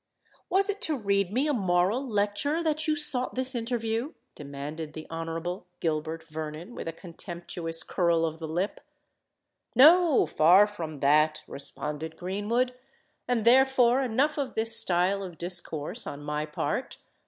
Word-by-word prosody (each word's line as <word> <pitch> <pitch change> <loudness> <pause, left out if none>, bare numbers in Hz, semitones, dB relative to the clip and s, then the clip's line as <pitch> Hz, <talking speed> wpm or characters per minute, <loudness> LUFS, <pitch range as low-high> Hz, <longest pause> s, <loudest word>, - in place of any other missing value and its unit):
"Was 385 +2 +3
it 410 0 -2
to 310 -3 0
read 200 -4 0
me 255 +7 +1
a 295 - +1
moral 190 +2 +1
lecture 225 +7 0
that 310 0 0
you 310 - +2
sought 275 -4 0
this 260 +1 0
interview?" 230 +3 -2 0.2
demanded 150 +2 -7
the 155 0 -8
Honourable 165 +2 -4
Gilbert 160 0 -2
Vernon, 160 +5 -7
with - - -7
a - - -1
contemptuous 170 -1 -4
curl 170 -2 +1
of 160 0 -4
the 160 - -5
lip. 175 +6 -2 0.9
"No—far 260 - +6
from 165 -8 -7
that!" 155 +2 +3
responded 150 +3 -6
Greenwood. 210 +7 -1 0.5
"And 235 -3 0
therefore 255 0 +5
enough 270 +5 +1
of 275 -3 -3
this 225 +1 +2
style 185 +3 +3
of 180 -4 -8
discourse 175 +2 -3
on 145 +1 -7
my 150 +1 -3
part. 150 - -3
190 Hz, 140 wpm, -27 LUFS, 160-250 Hz, 0.9 s, No—far